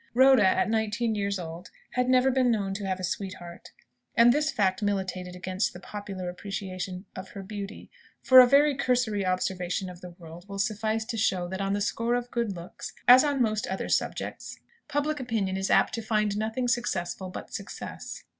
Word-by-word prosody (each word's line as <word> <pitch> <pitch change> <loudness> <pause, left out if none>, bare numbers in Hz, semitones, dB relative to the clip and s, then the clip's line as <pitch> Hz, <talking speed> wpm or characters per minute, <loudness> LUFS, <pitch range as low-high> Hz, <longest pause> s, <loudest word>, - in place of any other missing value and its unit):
Rhoda, 260 -2 +6
at 190 - +2
nineteen 220 +1 0
years 200 -1 -1
old, 170 0 -8 0.2
had 250 0 0
never 255 +1 +4
been 255 -1 +2
known 200 -4 0
to 195 0 -4
have 190 -1 -2
a - - -6
sweetheart. 180 -2 -5 0.5
And 235 +1 +7
this 300 +2 +1
fact 190 -6 +1
militated 190 -3 -2
against 185 +2 -2
the 180 - -9
popular 195 -2 -6
appreciation 185 0 -5
of 190 +1 -7
her 200 - -8
beauty; 200 0 -7 0.3
for 260 0 +9
a 250 - +9
very 285 +3 +5
cursory 250 -6 +1
observation 185 0 -1
of 175 0 -13
the 180 - -8
world 170 +3 -12
will 200 - -6
suffice 215 +2 -1
to 230 0 -4
show 185 -4 +1
that 190 +1 -4
on 195 0 0
the 205 - -1
score 230 +3 0
of 245 0 -3
good 235 -5 -1
looks, 170 +1 -8
as 250 +2 +9
on 285 -4 +2
most 215 -2 -1
other 190 - -3
subjects, - - -2 0.3
public 295 0 -1
opinion 220 -7 -1
is 190 0 -2
apt - - +4
to 230 - -2
find 215 -2 0
nothing 225 +4 -1
successful 190 -7 -1
but 185 - -9
success. - - -7
205 Hz, 190 wpm, -27 LUFS, 185-240 Hz, 0.5 s, for